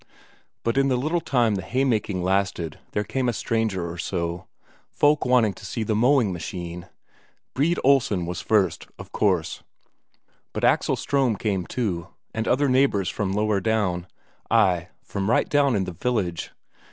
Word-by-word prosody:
But 115 Hz, +3 st, +1 dB
in 135 Hz, -, +3 dB
the 130 Hz, -, +2 dB
little 155 Hz, +7 st, 0 dB
time 120 Hz, -7 st, +2 dB
the 95 Hz, -, -2 dB
haymaking 110 Hz, -4 st, 0 dB
lasted 95 Hz, -4 st, -1 dB
there 105 Hz, -, 0 dB
came 125 Hz, +5 st, -1 dB
a -, -, -1 dB
stranger 110 Hz, -6 st, -1 dB
or 85 Hz, 0 st, -7 dB
so, 85 Hz, 0 st, -3 dB, 0.4 s
folk 150 Hz, 0 st, +2 dB
wanting 120 Hz, -5 st, +4 dB
to -, -, -15 dB
see 115 Hz, -, -3 dB
the 110 Hz, 0 st, 0 dB
mowing 120 Hz, -3 st, +3 dB
machine. 85 Hz, 0 st, -6 dB, 0.7 s
Brede 160 Hz, +6 st, +1 dB
Olsen 120 Hz, -10 st, +3 dB
was 90 Hz, +1 st, -4 dB
first, 100 Hz, -6 st, +1 dB
of -, -, -11 dB
course, 95 Hz, -6 st, 0 dB, 0.9 s
but -, -, -4 dB
Axel -, -, +3 dB
Ström 135 Hz, -6 st, 0 dB
came, 95 Hz, -4 st, -1 dB
too, 95 Hz, -8 st, -2 dB, 0.3 s
and 110 Hz, 0 st, -2 dB
other 140 Hz, +3 st, +3 dB
neighbours 130 Hz, -8 st, +2 dB
from 100 Hz, -3 st, -2 dB
lower 105 Hz, 0 st, +1 dB
down 95 Hz, -5 st, 0 dB, 0.4 s
ay, 90 Hz, -2 st, +3 dB, 0.2 s
from 100 Hz, 0 st, -3 dB
right 120 Hz, -, +3 dB
down 140 Hz, -4 st, +3 dB
in 100 Hz, -, +1 dB
the 90 Hz, -, -4 dB
village. 90 Hz, -4 st, -2 dB
105 Hz, 160 wpm, -24 LUFS, 90-125 Hz, 0.9 s, wanting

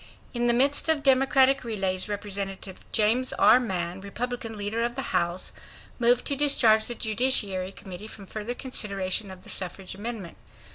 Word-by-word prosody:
In 240 Hz, -1 st, 0 dB
the 240 Hz, -, +4 dB
midst 280 Hz, +5 st, +3 dB
of 310 Hz, -3 st, +2 dB
Democratic 270 Hz, 0 st, +4 dB
delays, 195 Hz, -5 st, -2 dB
Representative 195 Hz, -2 st, -5 dB
James 230 Hz, +4 st, +2 dB
R. 245 Hz, -, +5 dB
Mann, 185 Hz, -5 st, -3 dB
Republican 225 Hz, +2 st, -5 dB
leader 205 Hz, +3 st, -3 dB
of 240 Hz, 0 st, -2 dB
the 270 Hz, -, -4 dB
House, 175 Hz, +2 st, -1 dB, 0.5 s
moved 240 Hz, +1 st, +3 dB
to 280 Hz, -, +1 dB
discharge 235 Hz, -6 st, +4 dB
the 240 Hz, -, -1 dB
Judiciary 215 Hz, -5 st, +2 dB
Committee 190 Hz, +1 st, -10 dB
from 210 Hz, -2 st, -11 dB
further 215 Hz, +5 st, -6 dB
consideration 200 Hz, -6 st, -2 dB
of 185 Hz, -1 st, -11 dB
the -, -, -12 dB
suffrage 185 Hz, +1 st, -4 dB
amendment. 205 Hz, -3 st, -6 dB
220 Hz, 155 wpm, -26 LUFS, 195-245 Hz, 0.5 s, R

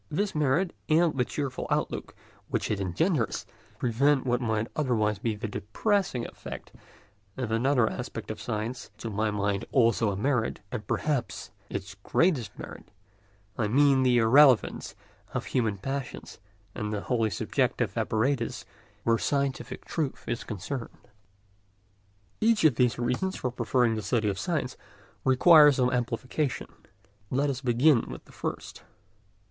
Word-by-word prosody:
This 200 Hz, +6 st, -1 dB
merit 150 Hz, +5 st, +1 dB, 0.2 s
and 160 Hz, 0 st, +4 dB
the 125 Hz, -, +2 dB
cheerful 135 Hz, 0 st, -4 dB
outlook -, -, -2 dB, 0.3 s
which -, -, -1 dB
it 105 Hz, -, 0 dB
engenders 115 Hz, -, 0 dB, 0.3 s
prevent 135 Hz, +3 st, +2 dB
what 125 Hz, 0 st, +1 dB
might 110 Hz, -2 st, 0 dB
otherwise 110 Hz, -8 st, +1 dB
be 110 Hz, 0 st, -1 dB
the 105 Hz, -, -4 dB
depressing 125 Hz, -, -1 dB
effect -, -, -9 dB, 0.7 s
of 125 Hz, -4 st, -3 dB
another 120 Hz, +1 st, +3 dB
aspect -, -, -5 dB
of -, -, -7 dB
science, 110 Hz, +4 st, -4 dB
to 115 Hz, -, -5 dB
my 110 Hz, +2 st, 0 dB
mind 100 Hz, 0 st, -1 dB
also 115 Hz, -4 st, +3 dB
a 100 Hz, -, -2 dB
merit, 120 Hz, +1 st, 0 dB
and 115 Hz, -4 st, -5 dB
perhaps 145 Hz, -5 st, -2 dB, 0.2 s
its 95 Hz, 0 st, -5 dB
greatest 125 Hz, -, 0 dB
merit—I 100 Hz, +2 st, -9 dB
mean 135 Hz, +3 st, +4 dB
the 125 Hz, -2 st, +4 dB
irrelevance 125 Hz, +2 st, +4 dB, 0.4 s
of -, -, -2 dB
human 110 Hz, -5 st, 0 dB
passions 135 Hz, +6 st, -5 dB, 0.3 s
and 105 Hz, -, -4 dB
of 105 Hz, -, -3 dB
the 105 Hz, -, -2 dB
whole 115 Hz, -4 st, 0 dB
subjective -, -, -1 dB
apparatus 115 Hz, +2 st, 0 dB, 0.4 s
where 115 Hz, -1 st, +2 dB
scientific 140 Hz, -2 st, -2 dB
truth 150 Hz, -5 st, -3 dB
is 120 Hz, 0 st, -2 dB
concerned. 115 Hz, +5 st, -6 dB, 1.3 s
Each 225 Hz, -3 st, +3 dB
of 155 Hz, -4 st, +6 dB
these 125 Hz, 0 st, +2 dB
reasons 125 Hz, +11 st, -1 dB
for 125 Hz, -, -2 dB
preferring 120 Hz, 0 st, +1 dB
the 110 Hz, -, -2 dB
study 105 Hz, +1 st, 0 dB
of 95 Hz, -2 st, -3 dB
science -, -, -2 dB, 0.5 s
requires 150 Hz, +2 st, +7 dB
some 125 Hz, -1 st, +2 dB
amplification. 125 Hz, +3 st, -2 dB, 0.6 s
Let 140 Hz, +2 st, +1 dB
us 135 Hz, 0 st, -5 dB
begin 125 Hz, +1 st, +3 dB
with -, -, -8 dB
the -, -, -17 dB
first. -, -, -6 dB
125 Hz, 140 wpm, -28 LUFS, 110-140 Hz, 1.3 s, requires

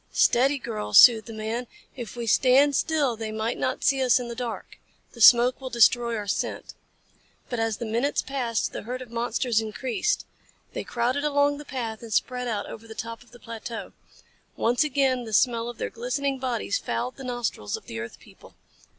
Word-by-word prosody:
"Steady, 270 Hz, +4 st, +3 dB
girl," 105 Hz, -, -4 dB
soothed 225 Hz, -2 st, +8 dB
the -, -, -7 dB
man. 220 Hz, +3 st, -4 dB, 0.3 s
"If 240 Hz, -3 st, -7 dB
we 240 Hz, -1 st, -4 dB
stand 265 Hz, +5 st, +4 dB
still 290 Hz, -6 st, +1 dB
they 220 Hz, -1 st, -5 dB
might 220 Hz, +2 st, -2 dB
not 255 Hz, -, -2 dB
see 270 Hz, -1 st, +3 dB
us 255 Hz, -1 st, +4 dB
in 245 Hz, -1 st, -5 dB
the 235 Hz, -, -6 dB
dark. 240 Hz, -2 st, -6 dB, 0.3 s
The 235 Hz, -, -11 dB
smoke 245 Hz, +3 st, +7 dB
will 260 Hz, -, -5 dB
destroy 235 Hz, -1 st, +3 dB
our 210 Hz, -, -4 dB
scent." 200 Hz, -, -3 dB, 0.8 s
But 245 Hz, -, -3 dB
as 225 Hz, -1 st, 0 dB
the 235 Hz, -, -5 dB
minutes 235 Hz, +6 st, 0 dB
passed 245 Hz, -5 st, -2 dB
the -, -, -5 dB
herd 250 Hz, +3 st, -5 dB
of 240 Hz, -, -16 dB
monsters 235 Hz, 0 st, 0 dB
increased. 245 Hz, -, -2 dB, 0.5 s
They -, -, -4 dB
crowded 250 Hz, +4 st, -1 dB
along 285 Hz, -1 st, +2 dB
the 295 Hz, -, -9 dB
path 230 Hz, -5 st, -5 dB
and 230 Hz, -1 st, -10 dB
spread 250 Hz, +3 st, 0 dB
out 210 Hz, -3 st, -2 dB
over 225 Hz, +1 st, -10 dB
the 220 Hz, -, -10 dB
top 230 Hz, +1 st, -6 dB
of 245 Hz, -, -19 dB
the 245 Hz, -, -15 dB
plateau. 230 Hz, -3 st, -7 dB, 0.6 s
Once 245 Hz, +5 st, +2 dB
again 265 Hz, -4 st, +1 dB
the 220 Hz, -, -8 dB
smell 235 Hz, +1 st, +2 dB
of 240 Hz, -, -8 dB
their -, -, -4 dB
glistening 270 Hz, +3 st, -2 dB
bodies 255 Hz, -, -1 dB
fouled 250 Hz, -, -3 dB
the 270 Hz, -, -9 dB
nostrils 240 Hz, -, -3 dB
of -, -, -15 dB
the 115 Hz, -, -6 dB
earth 115 Hz, +1 st, -7 dB
people. -, -, -18 dB
240 Hz, 195 wpm, -25 LUFS, 225-260 Hz, 0.8 s, soothed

